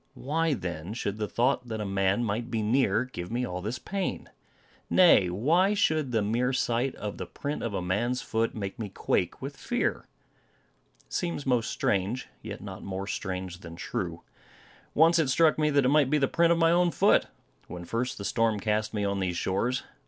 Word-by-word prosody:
Why, 160 +2 0
then, 85 0 -5
should 100 -3 -3
the 105 -1 -2
thought 125 +2 +1
that 110 -2 -4
a 105 - -3
man 95 +3 +1
might 115 +2 -2
be 110 -2 -1
near 115 0 +2
give 90 -9 -7
me 125 +2 0
all 90 -4 -4
this 110 +6 -3
pain? 195 +10 -4 0.6
Nay, 165 - +6
why 165 - +2
should 155 -9 +1
the 110 -3 +1
mere 120 +5 0
sight 125 +1 0
of 105 -1 -6
the - - -4
print 145 +1 -4
of 115 -4 -3
a 90 - -2
man's 120 +8 0
foot, 115 -1 -1
make 100 -1 -5
me 105 -3 -4
quake - - -1
with - - -5
fear? - - -2 1.0
It - - -17
seems 170 -5 -2
most 125 -4 +1
strange; 100 +6 -1
yet - - -7
not - - -8
more 95 0 -4
strange 95 -3 -4
than 85 -2 -10
true. 85 -1 -4 0.7
Once 165 +2 +5
it 155 -5 +2
struck 155 +3 +4
me 150 0 +3
that 140 -2 +3
it - - +4
might 145 -2 +4
be 150 - +3
the 140 -2 +2
print 170 +3 +3
of 170 - +4
my 165 0 +4
own 175 +1 +4
foot, 165 - +3 0.4
when 90 -1 -7
first 115 +6 -2
the 100 - -6
storm 115 -2 +1
cast 105 +1 -1
me 105 -1 0
on 100 0 -1
these 90 -2 -1
shores. 115 +7 0
115 Hz, 200 wpm, -28 LUFS, 100-140 Hz, 1.0 s, Nay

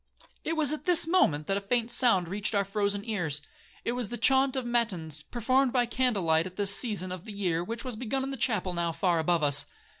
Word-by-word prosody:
'It 325 - -2
was 300 -3 +4
at 305 - -6
this 350 -2 +4
moment 165 - +2
that 195 +3 0
a - - -3
faint 235 +3 -1
sound 195 -9 +3
reached 205 +4 -2
our 200 -1 +1
frozen 200 0 -1
ears;—it 175 +1 -4
was 245 -3 -2
the 240 - -5
chaunt 265 0 +3
of 260 -2 -2
matins, 185 -11 -2
performed 255 - 0
by 245 -1 +2
candlelight 195 -10 +1
at 185 - -12
this 200 0 +3
season 205 -6 0
of 180 -1 -7
the 220 - -8
year, 180 -5 -1
which 230 +5 -6
was 250 -3 -4
begun 255 +4 -3
in 270 - -4
the - - -4
chapel 215 -7 -1
now 170 -1 -1
far 175 0 0
above 165 0 +1
us. 145 -1 +3
205 Hz, 220 wpm, -28 LUFS, 175-245 Hz, -, was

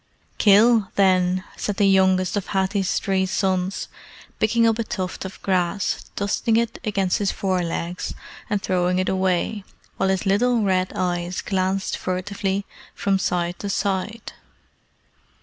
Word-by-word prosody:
"Kill, 215 +1 +5
then," 185 -1 +3
said 205 -2 -3
the 205 - +3
youngest 190 -1 +3
of 205 - -2
Hathi's 190 0 0
three 190 -1 0
sons, 190 -1 -1 0.5
picking 230 +2 +3
up 225 0 +2
a - - +1
tuft 190 -5 -4
of 190 - -8
grass, 185 +1 0
dusting 220 +3 +1
it 230 0 -1
against 195 -5 0
his 200 -2 +1
fore 185 -2 -1
legs, 170 +1 -4 0.3
and 205 - +1
throwing 180 0 +1
it 185 - 0
away, 190 +2 0 0.3
while 190 - +1
his 190 +2 0
little 225 +4 +2
red 185 -2 +1
eyes 175 0 -1
glanced 190 0 -1
furtively 195 +2 -2 0.3
from 195 -1 +1
side 175 -1 -1
to 200 - -4
side. 200 +3 -2
190 Hz, 140 wpm, -23 LUFS, 185-205 Hz, 0.5 s, Kill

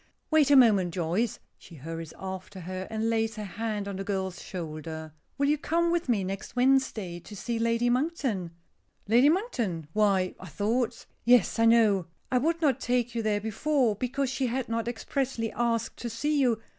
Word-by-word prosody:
"Wait 310 -3 +5
a 285 - +7
moment, 205 -9 +5
Joyce." 180 +7 -1 0.2
She 170 - -14
hurries 165 +2 -7
after 190 0 -7
her 185 +2 -5
and 220 0 -1
lays 225 -1 0
her 215 - -5
hand 210 +1 -3
on 200 -1 -4
the 195 - -3
girl's 190 -2 -3
shoulder. 160 -2 -6 0.2
"Will 280 - +2
you 300 0 +2
come 335 +3 +1
with 345 -5 -1
me 215 -5 +2
next 195 +5 -5
Wednesday 245 -9 +1
to 205 - -11
see 230 +3 -3
Lady 230 +1 +1
Monkton?" 250 - 0 0.6
"Lady 240 +7 +6
Monkton! 240 - -1
Why 195 -4 +2
I 185 - -9
thought 225 - -1
" - - -42
"Yes, 240 -2 +4
I 230 - +5
know. 215 -6 +4 0.2
I 250 - +3
would 330 +4 0
not 270 -4 +3
take 245 -2 0
you 230 - -1
there 210 -1 0
before, 235 +2 +1
because 255 +4 -1
she 260 0 0
had 250 +1 -2
not 230 0 -2
expressly 240 -1 -2
asked 230 -1 -1
to 240 - -4
see 290 +6 0
you. 240 -4 +2
225 Hz, 185 wpm, -28 LUFS, 190-255 Hz, 0.6 s, a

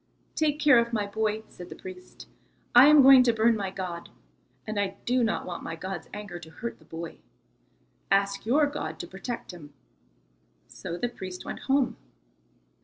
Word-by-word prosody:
"Take 300 -2 +1
care 290 -5 +6
of 235 0 -1
my 210 -2 0
boy," 215 +1 -2
said 180 0 -11
the - - -8
priest. 185 -1 -11 0.5
"I 245 +3 +9
am 300 -2 +8
going 265 -1 +9
to 245 -2 +3
burn 225 +1 +3
my 200 -3 -3
god, 185 -3 -6 0.6
and 215 -1 -3
I 200 -1 -2
do 250 0 +2
not 225 - -1
want 175 - -6
my 165 - -5
god's 185 0 -6
anger 205 -4 -7
to 160 - -12
hurt 230 +9 -7
the 155 - -21
boy. 165 +1 -8 0.9
Ask 200 0 +1
your 280 +7 +3
God 285 - -5
to - - -7
protect 195 +7 -6
him." 150 -4 -13 0.9
So 170 - -7
the 245 - -1
priest 185 -6 -8
went - - -6
home. 270 -2 +2
210 Hz, 180 wpm, -27 LUFS, 180-240 Hz, 0.9 s, I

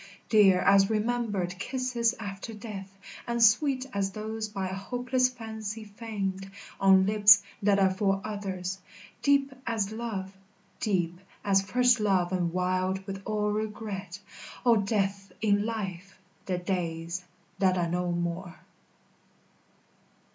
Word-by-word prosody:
Dear 195 -4 +6
as 195 0 +5
remembered 210 -5 -1
kisses 250 0 0
after 200 +1 -6
death, 205 -3 -8 0.4
And 235 0 -1
sweet 260 +4 +4
as 200 -1 0
those 215 +1 -4
by 195 -2 -3
hopeless 250 +6 0
fancy 220 -3 -6
feigned 200 -3 -5 0.3
On 190 -1 +6
lips 205 0 +7 0.2
that 200 -1 +3
are 190 -1 +4
for 195 0 +1
others; 190 -3 -4 0.4
deep 280 -1 +3
as 215 -3 -1
love, 210 -4 -5 0.4
Deep 175 -4 0 0.2
as 195 -1 +3
first 245 +5 +3
love 190 -4 +2
and 175 -2 0
wild 185 +1 -1
with 195 0 -6
all 210 -1 0
regret, 210 -3 -4 0.5
O 240 -2 +6
Death 200 -1 -1
in 205 0 +2
Life, 195 -4 -5 0.3
the 185 -2 0
days 175 -1 -3 0.4
that 185 -1 +3
are 175 -1 +1
no 175 +1 -1
more. 175 +1 -3
200 Hz, 125 wpm, -28 LUFS, 190-220 Hz, 0.5 s, lips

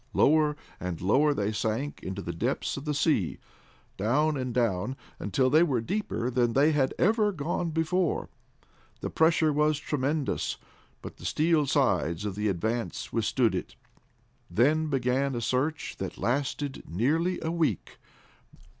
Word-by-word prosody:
Lower 150 0 +4 0.2
and 90 -2 -4
lower 135 - +3
they 105 -6 -1
sank 110 +6 -2
into 95 +1 -5
the 85 - -4
depths 120 +11 -1
of 140 - -7
the 150 - 0
sea, 140 - +1 0.6
down 145 +10 +2
and 130 -2 -3
down, 115 -1 0 0.2
until 130 +6 +1
they 155 - +6
were 140 -8 +2
deeper 125 - -2
than 120 -2 +1
they 145 +5 +4
had 140 -3 +1
ever 210 +2 +3
gone 170 +1 -2
before. 160 +2 0 0.7
The - - -4
pressure 160 -1 +3
was 150 0 +2
tremendous, 145 0 -1 0.5
but - - -8
the - - -11
steel 155 -2 +2
sides 85 -5 +1
of 105 - -2
the 105 +2 -1
Advance 110 +5 -2
withstood 115 +1 +2
it. - - -4 0.7
Then 155 +7 +2
began 135 -1 0
a - - -1
search 135 +7 -1
that - - -5
lasted 140 +2 -2
nearly 155 - +1
a 160 - -1
week. 160 - -1
135 Hz, 145 wpm, -28 LUFS, 115-155 Hz, 0.7 s, they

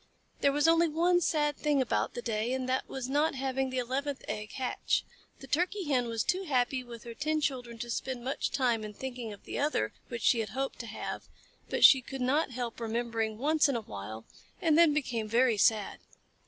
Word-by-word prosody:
There 280 - +3
was 290 +2 +2
only 330 +1 +5
one 345 +3 +2
sad 295 -3 +1
thing 295 -2 +1
about 260 - 0
the 240 - -5
day, 225 +1 -1
and 260 -1 -2
that 260 0 -1
was 265 -2 -4
not 290 +3 +1
having 265 0 -1
the 260 - -4
eleventh 265 +3 -2
egg 210 0 -5
hatch. 255 -2 -1 0.4
The - - -8
Turkey 355 +8 0
Hen 250 -4 +2
was 230 -1 -1
too 370 +2 0
happy 255 -3 +1
with 235 -2 -10
her 235 - -7
ten 305 +6 0
children 250 -5 -2
to 235 +1 -6
spend 255 0 -3
much 265 +2 -1
time 245 -5 +1
in 210 -1 -7
thinking 245 -3 -5
of 205 - -11
the - - -4
other 285 - 0
which 235 -1 -5
she 235 - +4
had 220 -2 -2
hoped 270 0 -2
to 235 - -6
have, 220 - -6 0.4
but - - +5
she 265 - +8
could 270 +2 -7
not 275 +5 +2
help 245 -2 -5
remembering 225 -1 -2
once 300 +4 +3
in 275 - 0
a 230 - -1
while, 110 - -8 0.3
and 320 -3 +3
then 335 0 +7
she - - +1
became 240 -7 -1
very 235 0 +3
sad. 215 0 +2
255 Hz, 215 wpm, -30 LUFS, 230-290 Hz, 0.4 s, she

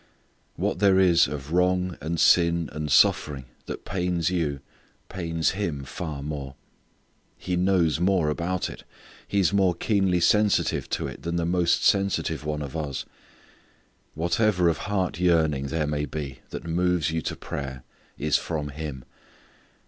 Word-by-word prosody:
What - - -1
there 95 -2 +5
is 90 -3 +5
of 75 0 -6
wrong 90 0 +2
and 80 +1 -2
sin 85 -2 +4
and 75 -1 -4
suffering 70 +1 +3 0.2
that - - -6
pains 90 -2 -1
you, 75 -6 -1 0.5
pains 80 -3 -1
Him 85 -8 -3
far 75 0 -6
more. 70 -2 -5 0.8
He 90 - -3
knows 90 -4 +2
more 90 -3 +2
about 85 +4 -2
it. - - -10 0.4
He 100 - 0
is 95 0 +2
more 95 -3 +3
keenly 95 -1 +1
sensitive 105 +4 +2
to - - -2
it - - -7
than 85 0 -3
the 85 -1 0
most 85 0 +2
sensitive 100 -5 +1
one 75 0 -3
of 70 +2 -7
us. 75 -4 -3 1.1
Whatever 90 +2 +2
of 80 - -1
heart 95 -4 -1
yearning 80 -6 +2
there 75 +2 -1
may 75 0 -2
be 70 -1 -6
that - - -7
moves 85 -2 +1
you 80 0 -1
to - - -3
prayer 65 -2 -6 0.3
is 75 -1 +2
from 75 -3 -3
Him. 70 -3 -6
85 Hz, 150 wpm, -25 LUFS, 75-90 Hz, 1.1 s, there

